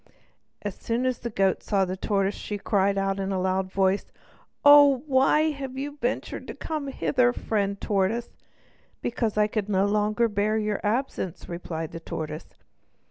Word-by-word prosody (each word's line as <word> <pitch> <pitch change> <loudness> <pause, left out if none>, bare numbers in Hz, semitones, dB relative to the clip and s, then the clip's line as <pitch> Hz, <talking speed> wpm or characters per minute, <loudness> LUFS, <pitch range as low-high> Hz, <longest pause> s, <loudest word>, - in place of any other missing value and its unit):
As 205 -2 -3
soon 235 +6 -2
as 255 -2 0
the 235 - -4
goat 195 -3 +1
saw 195 -2 +1
the 185 0 -3
tortoise 195 0 0
she 205 - -5
cried 200 -1 +1
out 195 0 0
with 195 0 -2
a 190 - 0
loud 185 0 0
voice: 195 +1 +1 0.6
"Oh, 285 -2 +8
why 300 +3 +3
have 270 -2 -6
you 290 +2 -5
ventured 245 +2 -2
to - - -6
come 305 -3 -4
hither, 250 -2 +2
friend 200 -4 -1
tortoise?" 205 +4 0 0.7
"Because 230 -3 -1
I 210 - +5
could 210 -1 -2
no 195 -1 +2
longer 210 +2 +2
bear 210 0 0
your 210 -1 -1
absence," 210 - -2
replied 165 -2 -5
the 165 - -6
tortoise. 155 -1 -6
210 Hz, 165 wpm, -26 LUFS, 195-245 Hz, 0.7 s, Oh